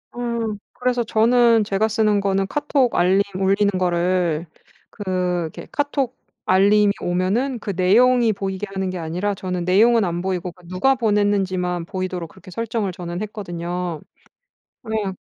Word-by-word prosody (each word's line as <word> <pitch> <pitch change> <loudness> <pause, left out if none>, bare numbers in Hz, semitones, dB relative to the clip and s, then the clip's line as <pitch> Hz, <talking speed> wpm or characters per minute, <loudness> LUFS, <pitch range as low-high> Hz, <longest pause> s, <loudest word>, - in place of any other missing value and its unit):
음. 235 -3 -2 0.2
그래서 250 -1 0
저는 230 +1 +4
제가 205 +1 +1
쓰는 215 -2 +2
거는 195 -1 0
카톡 275 -1 0
알림 185 +3 +4
울리는 195 +2 +2
거를 175 -2 +1 0.4
그 205 - -9 0.4
이렇게 160 - -8
카톡 280 -3 -1 0.3
알림이 200 +2 +4
오면은 200 +9 0
그 205 - -4
내용이 235 +6 +4
보이게 195 0 -4
하는 190 -1 -2
게 185 - -4
아니라 180 +6 -2
저는 180 -2 -4
내용은 220 +4 +4
안 175 -1 -2
보이고 180 -1 -2
그 180 0 -21
누가 185 +10 +2
보냈는지만 195 -6 0
보이도록 185 -3 -4
그렇게 185 +2 -15
설정을 225 -1 -2
저는 175 +1 -6
했거든요. 175 -5 -4 0.8
그래야 215 -3 -2
195 Hz, 320 characters per minute, -21 LUFS, 180-225 Hz, 0.8 s, 저는